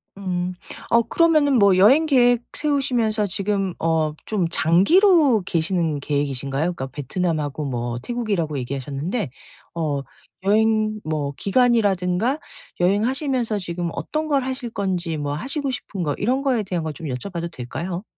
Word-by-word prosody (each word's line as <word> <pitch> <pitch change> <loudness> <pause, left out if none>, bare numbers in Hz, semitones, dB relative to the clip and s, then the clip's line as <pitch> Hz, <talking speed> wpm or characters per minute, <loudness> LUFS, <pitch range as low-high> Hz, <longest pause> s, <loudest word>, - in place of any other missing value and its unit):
음. 180 -2 -3 0.4
어 235 0 +5
그러면은 295 -2 +3
뭐 200 -2 +5
여행 265 +12 +6
계획 245 -4 +4 0.2
세우시면서 245 -8 +1
지금 195 -1 -1
어 160 -2 +1
좀 195 -6 0
장기로 275 - +4
계시는 165 -3 0
계획이신가요? 140 0 -1
그니까 135 -6 -5
베트남하고 150 +1 -2
뭐 120 -2 -3
태국이라고 200 - -2
얘기하셨는데 140 - -3 0.5
어 150 -4 -1 0.4
여행 215 +1 +2
뭐 150 -3 -2
기간이라든가, 215 - +2 0.4
여행하시면서 230 - +1
지금 175 -1 -3
어떤 310 0 -3
걸 280 -3 +1
하실 260 -2 -4
건지, 185 -6 -2
뭐 145 -1 -2
하시고 275 - -2
싶은 195 -7 -5
거 150 -3 0
이런 255 +6 0
거에 255 -6 +1
대한 180 -4 -3
걸 155 -1 -3
좀 160 +3 -7
여쭤봐도 170 +6 -4
될까요? 170 +8 -5
190 Hz, 325 characters per minute, -22 LUFS, 160-240 Hz, 0.5 s, 여행